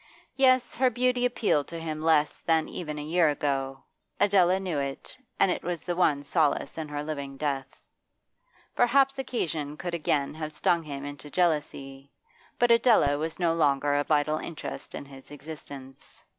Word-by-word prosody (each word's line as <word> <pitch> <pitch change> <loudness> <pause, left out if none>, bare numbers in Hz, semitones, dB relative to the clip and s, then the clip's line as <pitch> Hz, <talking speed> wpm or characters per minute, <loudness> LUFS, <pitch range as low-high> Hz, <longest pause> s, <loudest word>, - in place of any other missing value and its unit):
Yes, 255 -2 +3
her 260 +1 +3
beauty 250 +1 +1
appealed 215 - 0
to 170 - -7
him 155 -1 -4
less 155 -2 +2
than 160 -1 +1
even 150 -4 -6
a 150 - -4
year 165 +1 +3
ago; 135 -2 -2 0.4
Adela 190 -2 +4
knew 180 -6 -2
it, 140 -1 -5 0.2
and 190 - +4
it - - -2
was 175 -1 -4
the 175 - -2
one 150 -5 +2
solace 150 -1 +1
in 160 -1 -5
her 145 0 -4
living 140 -3 -5
death. 135 -3 -2 1.1
Perhaps 270 +2 +3
occasion 155 - -3
could 175 -1 -5
again 150 -4 0
have 155 0 -6
stung 170 +2 +1
him 140 -3 -7
into 145 +1 -8
jealousy, 145 -5 -1 0.5
but 240 -1 +3
Adela 225 - +4
was 160 +1 -3
no 170 -2 +2
longer 145 -3 +2
a 145 0 +2
vital 150 +1 +1
interest 170 - -7
in - - -6
his 135 -1 -14
existence. 140 -2 -10
155 Hz, 165 wpm, -27 LUFS, 145-180 Hz, 1.1 s, Adela